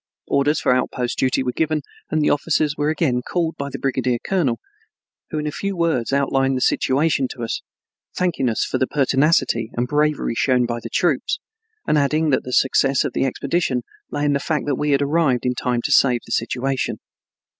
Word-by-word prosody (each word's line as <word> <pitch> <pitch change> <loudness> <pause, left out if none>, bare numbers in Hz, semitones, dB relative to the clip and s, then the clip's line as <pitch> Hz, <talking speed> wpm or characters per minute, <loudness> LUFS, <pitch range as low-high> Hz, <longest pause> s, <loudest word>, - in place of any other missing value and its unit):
Orders 145 +2 +1
for - - +2
outpost 125 -1 -1
duty 130 0 +1
were 125 - -1
given 155 +2 -1 0.3
and 155 -1 +1
the - - +3
officers 150 0 +1
were 150 0 0
again 145 -6 +1
called 165 +4 -2
to 140 0 -3
the - - -4
brigadier 130 -2 0
colonel, 140 -5 0 0.7
who 155 - -4
in 150 - -2
a 150 - -1
few 200 +5 -3
words 160 -9 0
outlined 135 -1 +1
the - - -3
situation 140 +1 +2
to 120 -1 -7
us, 115 - -3 0.5
thanking 175 -8 0
us 110 - 0
for - - -2
the 130 - +1
pertinacity 135 -4 +2
and 120 +1 0
bravery 150 -2 +1
shown 125 +1 +2
by 120 0 -3
the - - -7
troops, 170 -8 +1 0.5
and 150 - +3
adding 155 +2 +1
that - - +2
the 125 - -7
success 135 +1 +3
of - - -3
the - - +1
expedition 135 -1 -1 0.3
lay 145 0 -2
in 145 - +2
the 140 - +1
fact 150 0 -1
that 145 - 0
we 150 +3 -1
had 140 0 +3
arrived 140 -5 +1
in 125 - +2
time 120 -1 -1
to - - -2
save 125 -3 +4
the - - -12
situation. 130 +3 -1
140 Hz, 200 wpm, -21 LUFS, 125-150 Hz, 0.7 s, save